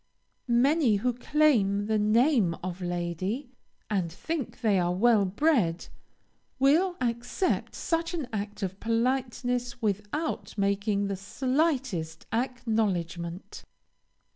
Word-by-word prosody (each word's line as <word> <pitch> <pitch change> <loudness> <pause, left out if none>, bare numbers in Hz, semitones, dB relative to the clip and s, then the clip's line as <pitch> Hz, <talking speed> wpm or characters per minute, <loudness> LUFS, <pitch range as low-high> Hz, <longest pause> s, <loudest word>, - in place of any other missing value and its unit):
Many, 255 0 +3
who 245 +5 0
claim 235 -7 +2
the 215 0 +1
name 215 - +3
of 185 0 -5
lady, 175 - -3 0.4
and 185 -6 -1
think 310 - -4
they 210 -5 +3
are 175 0 +1
well 215 0 +4
bred, 195 - +1 0.7
will 325 +8 +3
accept 245 +8 -1
such 330 +1 -1
an 305 -7 -3
act 205 0 -4
of 190 +1 -4
politeness 245 +1 -1
without 215 - -2
making 200 +1 +1
the 200 0 -2
slightest 255 - -1
acknowledgement. 200 -8 -2
225 Hz, 105 wpm, -28 LUFS, 195-260 Hz, 0.7 s, well